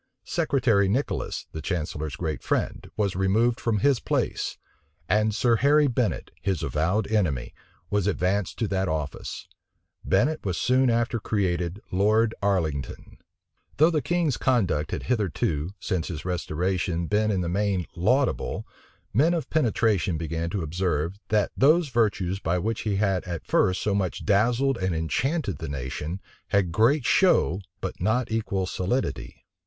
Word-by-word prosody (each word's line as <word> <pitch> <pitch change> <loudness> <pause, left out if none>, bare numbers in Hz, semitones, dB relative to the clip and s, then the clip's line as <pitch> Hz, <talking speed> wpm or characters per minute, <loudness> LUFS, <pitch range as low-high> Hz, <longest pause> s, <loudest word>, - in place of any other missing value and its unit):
Secretary 115 -8 +2
Nicholas, 130 +8 -2
the 80 - -6
chancellor's 80 -4 -3
great 80 -3 -3
friend, - - -2
was 100 -4 0
removed 110 +6 +2
from 115 -3 0
his 140 -2 +3
place; - - -1 0.5
and 105 +2 +2
Sir 120 -1 +3
Harry 145 +4 +4
Bennet, 125 -4 -1
his 95 -5 -1
avowed 90 +8 0
enemy, 75 - 0 0.4
was 105 -2 +1
advanced 95 0 0
to 115 - 0
that 95 -1 0
office. 75 -2 -4 0.6
Bennet 155 +4 +1
was 95 -4 -2
soon 130 0 +3
after 115 0 +1
created 90 -3 -1
Lord 110 +4 +3
Arlington. 85 -8 -2 0.6
Though 155 +3 +5
the 155 -3 +1
king's 160 -1 0
conduct 95 - +1
had - - -4
hitherto, 90 - -1
since 90 -3 -2
his 80 -3 -6
restoration, 90 0 -1
been 105 +4 +1
in 95 -3 +1
the 85 - -2
main 95 0 0
laudable, 125 +10 +1 0.5
men 155 - +4
of 165 - -4
penetration 110 - +1
began 80 +1 -3
to 95 -1 -2
observe, 85 +2 -1
that 105 -2 +2
those 155 +4 +4
virtues 100 -6 +1
by 85 -1 0
which 110 +5 -2
he 105 -3 -1
had 95 -2 +1
at 85 -3 -5
first 95 0 +2
so 105 - +1
much 95 -3 -2
dazzled 120 +6 +2
and 95 -2 0
enchanted 125 - -1
the 80 - -5
nation, 70 +6 -4 0.3
had 100 -4 +1
great 120 - +3
show, 105 - +3 0.2
but - - -5
not 110 +5 +1
equal 100 -4 -1
solidity. 90 - -3
100 Hz, 150 wpm, -26 LUFS, 85-115 Hz, 0.6 s, Though